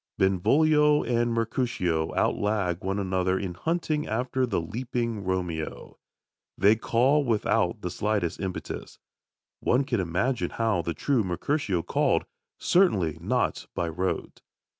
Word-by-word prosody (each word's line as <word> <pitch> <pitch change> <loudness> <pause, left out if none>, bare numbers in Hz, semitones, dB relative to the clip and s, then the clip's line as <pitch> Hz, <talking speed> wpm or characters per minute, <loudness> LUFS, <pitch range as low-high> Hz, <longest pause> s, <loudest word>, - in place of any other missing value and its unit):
Benvolio 150 - +4
and 120 0 +1
Mercutio 115 -8 0
outlag 100 -5 0
one 95 +1 -1
another 95 -1 0
in 95 -2 -3
hunting 155 - -1
after 125 +3 0
the 115 - 0
leaping 115 +3 -3
Romeo. 90 -4 -4 0.6
They 100 +3 +5
call 130 +6 +2
without 115 -5 +1
the - - -3
slightest 100 -5 -1
impetus. 95 -2 -5 0.6
One 125 +3 +2
can 125 -5 -1
imagine 95 +9 0
how 110 -6 0
the 85 0 -3
true 135 -6 +1
Mercutio 95 - -1
called - - +1 0.3
certainly 95 - +2
not 125 +8 -1
by 85 - -1
rote. 90 +3 -3
105 Hz, 120 wpm, -27 LUFS, 90-125 Hz, 0.6 s, They